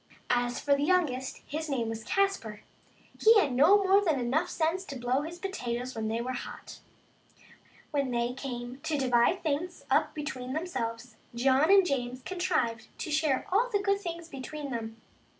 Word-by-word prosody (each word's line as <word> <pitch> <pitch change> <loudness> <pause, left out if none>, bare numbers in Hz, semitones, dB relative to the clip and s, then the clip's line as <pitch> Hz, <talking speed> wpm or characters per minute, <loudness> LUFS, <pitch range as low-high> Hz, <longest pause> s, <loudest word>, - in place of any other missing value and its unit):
As 245 0 +1
for 285 -1 +3
the 280 - -2
youngest, 290 -6 0
his 310 +2 -4
name 245 -5 -1
was 225 0 -5
Caspar, 390 - -1 0.6
he 445 0 +8
had 285 -9 +1
no 305 +11 +6
more 390 +1 +5
than 315 -8 +1
enough 285 +9 0
sense 335 +3 0
to 280 - -7
blow 250 +3 0
his 330 +3 -6
potatoes 255 -10 -4
when 220 -1 -3
they 225 +1 -1
were 255 +2 -3
hot. 250 - -8 1.1
Well, 290 -2 +2
when 255 - -4
they 240 0 0
came 250 -1 -6
to 305 0 -1
divide 255 +6 +2
things 325 +3 -2
up - - +2
between 260 -4 -4
themselves, 240 -8 -4 0.2
John 265 +5 +3
and 390 -1 +7
James 255 -4 -2
contrived 325 -12 -1
to 315 - -4
share 300 -3 +1
all 440 +6 +3
of - - -15
the 410 - +3
good 400 0 +1
things 340 -2 -5
between 280 0 -7
them. 225 -1 -5
275 Hz, 180 wpm, -29 LUFS, 245-345 Hz, 1.1 s, he